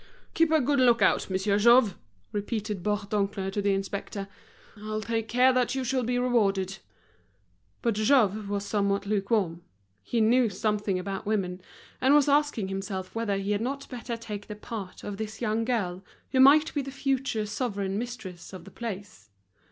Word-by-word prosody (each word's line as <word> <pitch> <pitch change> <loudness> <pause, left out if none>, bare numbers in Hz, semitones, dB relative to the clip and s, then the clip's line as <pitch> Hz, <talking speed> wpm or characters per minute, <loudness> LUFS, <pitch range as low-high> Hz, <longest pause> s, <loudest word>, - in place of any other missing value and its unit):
"Keep 330 -1 +3
a 315 - +5
good 280 +1 +1
look 240 -4 +5
out, 195 - +2
Monsieur 195 +2 +1
Jouve," 235 -2 +5 0.4
repeated 210 -1 -3
Bourdoncle 200 -1 -1
to 205 - -1
the 200 -1 +2
inspector, 195 +1 -4 0.5
"I'll 215 +1 -4
take 225 0 -2
care 250 +3 +4
that 250 0 +1
you 265 - -1
shall 255 +1 0
be 245 +1 -1
rewarded." 200 -6 +1 1.0
But 235 - +2
Jouve 215 -2 +2
was 205 0 -2
somewhat 200 -1 0
lukewarm, 200 -4 0 0.4
he 235 - -2
knew 230 +2 +4
something 205 0 -1
about 195 +2 -5
women, 190 -4 -1 0.4
and 265 +3 +5
was 295 -1 +5
asking 285 -8 +2
himself 195 -1 -4
whether 225 -3 -1
he 195 +1 -2
had 205 0 0
not 275 +4 -3
better 240 -2 -5
take 210 -3 -7
the 210 - -6
part 210 -3 -7
of 205 -1 -5
this 220 0 -5
young 225 -1 0
girl, 195 -7 -1 0.3
who 260 - +2
might 295 +4 +6
be 290 - 0
the 275 - -6
future 270 -5 -1
sovereign 205 -3 -2
mistress 220 -8 -7
of 180 -2 -9
the 195 - -12
place. 200 - -7
215 Hz, 170 wpm, -27 LUFS, 195-245 Hz, 1.0 s, might